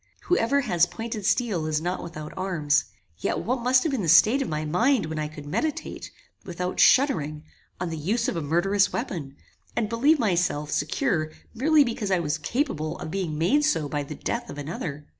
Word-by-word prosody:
Whoever 280 -5 +2
has 180 -8 +2
pointed 220 -1 -5
steel 210 -9 +1
is 155 -1 0
not 180 +3 -3
without 155 -3 -8
arms; 175 -6 +1 0.3
yet - - -1
what 250 +2 -1
must 255 +1 +4
have 320 - 0
been 265 -5 -1
the 170 - -1
state 220 - +6
of 275 - -2
my 155 0 -2
mind 230 - +2
when 160 0 -4
I 150 - -1
could 150 -1 -10
meditate, 300 - -3 0.3
without 180 -1 -4
shuddering, 155 - +3 0.4
on 175 -2 -3
the 160 - -4
use 225 - 0
of 255 - -1
a 165 - -2
murderous 185 +7 +2
weapon, 165 - -4 0.4
and 215 -3 0
believe 275 +8 +3
myself 175 - 0
secure 155 - 0 0.2
merely 295 +5 +4
because 230 -5 -3
I 190 - +3
was 160 -2 -1
capable 155 - -2
of 155 - -6
being 175 -5 -2
made 250 - +3
so 225 - +1
by 145 0 -2
the 145 +2 -7
death - - -3
of - - -8
another? 150 0 -5
180 Hz, 195 wpm, -25 LUFS, 155-235 Hz, 0.4 s, state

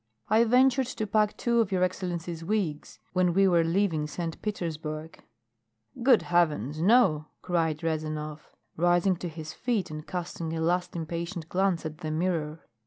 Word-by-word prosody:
I 220 +2 +5
ventured 255 +2 +4
to 225 -3 -3
pack 210 0 +1
two 235 -1 +1
of 220 -4 +1
your 185 -1 +2
excellency's 175 -2 -3
wigs 175 -6 -2 0.2
when 180 -1 +2
we 195 0 +5
were 170 -2 +4
leaving 165 -3 +1
St. 165 +2 -5
Petersburg 160 -6 -5 0.4
" 110 - -19
"Good 245 -2 +5
heavens, 155 -4 +1
no!" 175 -7 +4 0.2
cried 165 -3 0
Rezanov, 155 -1 -3 0.3
rising 175 +3 +3
to 175 - -5
his 155 -1 -8
feet 225 -9 -1
and 155 0 -7
casting 170 -2 -4
a - - -2
last 175 +2 0
impatient 170 0 -4
glance 185 -3 +1
at 155 0 -6
the 160 -3 -4
mirror. 160 -1 -1
170 Hz, 160 wpm, -28 LUFS, 155-190 Hz, 0.4 s, I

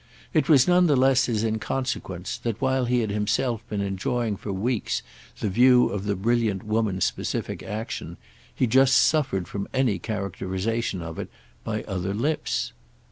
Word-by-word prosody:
It 155 - +2
was 140 -5 +6
none 180 0 +5
the 145 - +4
less 130 0 +4
his 110 -3 0
inconsequence 110 -5 -3
that 115 -2 -3
while 130 -1 +1
he 125 0 +2
had 110 -2 -2
himself 105 +3 0
been 105 -2 -2
enjoying 100 +3 -1
for 100 - -6
weeks 110 +4 -1 0.4
the - - 0
view 125 +5 +5
of 100 0 -4
the 100 -1 0
brilliant 110 -1 0
woman's 105 -3 0
specific - - -3
action, 110 +3 -5 0.4
he - - +2
just 130 +3 +4
suffered 135 - +2
from 100 -1 -4
any 130 -6 +2
characterisation 100 0 -3
of 80 0 -7
it - - -5 0.3
by 110 -1 -3
other 95 0 -3
lips. 145 +8 -1
110 Hz, 160 wpm, -25 LUFS, 100-130 Hz, 0.4 s, was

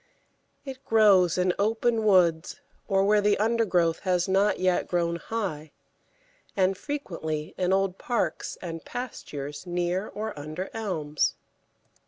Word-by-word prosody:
It 265 -1 -8
grows 200 - +4
in 180 0 +2
open 225 +2 +1
woods 180 -5 +3 0.3
or 195 -1 +2
where 210 +1 +4
the 205 0 +3
undergrowth 205 -7 +1
has 180 -2 0
not 195 +2 +2
yet 185 -1 +1
grown 170 -1 0
high, 170 -8 -4 0.8
and 190 0 +3
frequently 170 - -4
in 180 0 0
old 195 -1 +1
parks 240 -2 -2
and 165 -2 -6
pastures 150 - -6
near 175 +3 -1
or 215 +1 -5
under 155 +6 -6
elms. 165 -9 -1
185 Hz, 125 wpm, -27 LUFS, 170-215 Hz, 0.8 s, grows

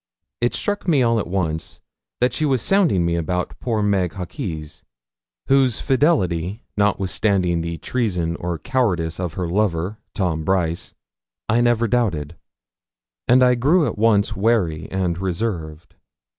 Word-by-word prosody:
It 120 - +1
struck 205 -2 -2
me 145 -7 +4
all 115 -1 +2
at 100 - -3
once 85 -4 -3 0.4
that 125 - +3
she 155 - -1
was 135 -5 +1
sounding 170 - +3
me 85 0 +1
about 90 +2 -2
poor 110 -4 -1
Meg 95 -4 +1
Hawkes, 90 - -6 0.6
whose 135 -4 +3
fidelity, 110 - +1
notwithstanding 95 -3 +1
the 85 0 -4
treason 90 -10 -1
or 85 -1 -3
cowardice 90 -10 -1
of 90 -3 -3
her 90 -1 -3
lover, 95 +1 -1 0.2
Tom 85 -6 -1
Brice, 85 -1 -1 0.5
I 115 +2 +3
never 120 -1 +2
doubted; 90 -10 0 0.9
and 130 +1 +6
I 125 0 +5
grew 150 +8 +3
at 115 - -2
once 105 -2 +2
wary 95 -7 0
and 90 -2 -1
reserved. 85 -4 -4
95 Hz, 140 wpm, -21 LUFS, 85-120 Hz, 0.9 s, and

